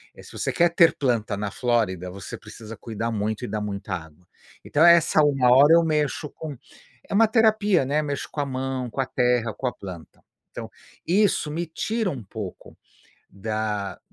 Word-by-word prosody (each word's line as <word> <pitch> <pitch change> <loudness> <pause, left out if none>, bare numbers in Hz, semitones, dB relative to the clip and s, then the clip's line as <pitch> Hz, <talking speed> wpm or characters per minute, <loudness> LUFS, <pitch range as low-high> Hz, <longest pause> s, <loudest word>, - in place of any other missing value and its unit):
eh, - - -13
se - - -14
você - - -2
quer 175 0 +4
ter 170 -1 +5
planta 115 -6 0
na 100 0 -4
Flórida, 105 -7 0
você 95 0 -8
precisa 110 0 -11
cuidar 115 +2 -4
muito 110 0 -2
e - - -3
dar 105 - -2
muita 100 -2 -5
água. 80 0 -11 0.4
Então, 155 +3 +3
é 170 0 +9
essa 165 -2 +3
1 135 -4 +3
hora 140 +5 +7
eu 170 0 +6
mexo 150 -1 -1
com 155 -2 -8 0.5
é - - -4
uma 220 +3 +5
terapia, 215 - +3
né, 145 +3 +1
mexo 145 -2 -4
com - - -6
a - - -1
mão, 130 -1 -3
com 135 - -2
a 130 - -1
terra, 125 -3 +1
com 130 - -3
a - - -2
planta. 90 -6 -11 0.3
Então, - - -7 0.4
isso 190 -4 +2
me 170 +3 -2
tira 215 +6 -2
um 130 -5 -7
pouco 100 -1 -9 0.5
da 105 -1 -3
125 Hz, 190 wpm, -24 LUFS, 105-155 Hz, 0.5 s, é